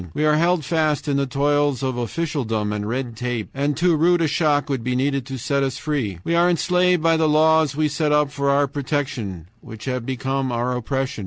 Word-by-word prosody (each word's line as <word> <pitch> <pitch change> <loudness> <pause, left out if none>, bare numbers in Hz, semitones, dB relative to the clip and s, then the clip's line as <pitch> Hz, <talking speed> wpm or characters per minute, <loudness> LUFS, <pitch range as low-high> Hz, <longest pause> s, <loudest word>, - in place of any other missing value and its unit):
We 150 - +1
are 150 - +4
held 170 0 +2
fast 155 -1 0
in 140 -1 +1
the 140 0 0
toils 145 0 +1
of 130 -1 -1
officialdom 120 -5 -2
and 105 0 -3
red 125 -1 -3
tape, 125 -2 -3
and 140 +1 -1
too 170 0 +3
rude 170 +2 +3
a - - +2
shock 150 -1 +1
would 135 -5 -2
be 125 +1 -1
needed 135 0 -1
to 135 -1 -5
set 140 +3 -1
us 135 -1 -1
free. 135 - -2
We 170 - -1
are 170 +1 +4
enslaved 180 0 +2
by 165 0 +3
the 160 -1 +2
laws 155 -1 +3
we 155 +1 +1
set 150 +1 -1
up 150 -1 +2
for 140 -1 -1
our 140 +1 +3
protection, 135 - -4
which 110 -1 -11
have 125 -2 -2
become 130 +1 -2
our 120 +1 -1
oppression. 130 +1 -3
140 Hz, 220 wpm, -22 LUFS, 125-155 Hz, -, are